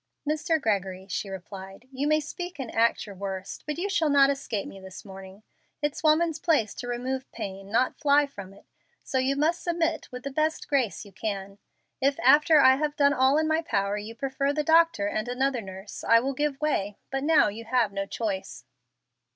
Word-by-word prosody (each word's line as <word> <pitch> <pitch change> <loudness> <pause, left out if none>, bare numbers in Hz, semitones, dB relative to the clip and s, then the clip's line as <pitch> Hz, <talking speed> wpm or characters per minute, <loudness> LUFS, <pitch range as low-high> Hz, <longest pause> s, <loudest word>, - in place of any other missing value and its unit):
"Mr. 315 +2 +1
Gregory," 195 -6 -1
she 195 +1 -3
replied, 195 +3 -9
"you 270 +2 -2
may 305 0 +3
speak 350 +4 -6
and 260 -5 -6
act 230 +1 +2
your 205 - -9
worst, 190 0 -6
but 300 - -3
you 365 +4 -1
shall 335 -6 +1
not 280 -1 +5
escape 240 -7 -3
me 195 - -10
this 190 +1 -11
morning. 195 +1 -11 0.4
It's 295 -1 -2
woman's 320 +1 +3
place 285 -12 +1
to 245 - -7
remove 255 +2 -3
pain, 195 0 -7
not 245 +3 +1
fly 290 0 +4
from 200 -9 -10
it. 195 - -18 0.4
So 260 - -1
you 265 +2 +1
must 315 +4 +1
submit 335 -2 -1
with 250 0 -8
the 275 - -4
best 310 +3 -1
grace 260 -7 0
you 200 - -14
can. 200 0 -5 0.4
If 275 +1 +2
after 300 +4 +6
I 260 -1 +6
have 295 0 -1
done 285 0 +4
all 265 +1 +3
in 315 0 +2
my 315 +1 +2
power 200 -10 -1
you 210 +2 -6
prefer 275 +2 -1
the 300 +1 -1
doctor 325 -8 +4
and 215 +2 -2
another 255 0 0
nurse, 190 0 -9
I 230 - +6
will 270 +3 -2
give 290 0 -1
way, 210 -10 -1
but 270 0 -2
now 305 -7 +4
you 225 +3 -8
have 230 -2 +1
no 195 0 -3
choice." 200 -4 -4
260 Hz, 200 wpm, -27 LUFS, 200-295 Hz, 0.4 s, after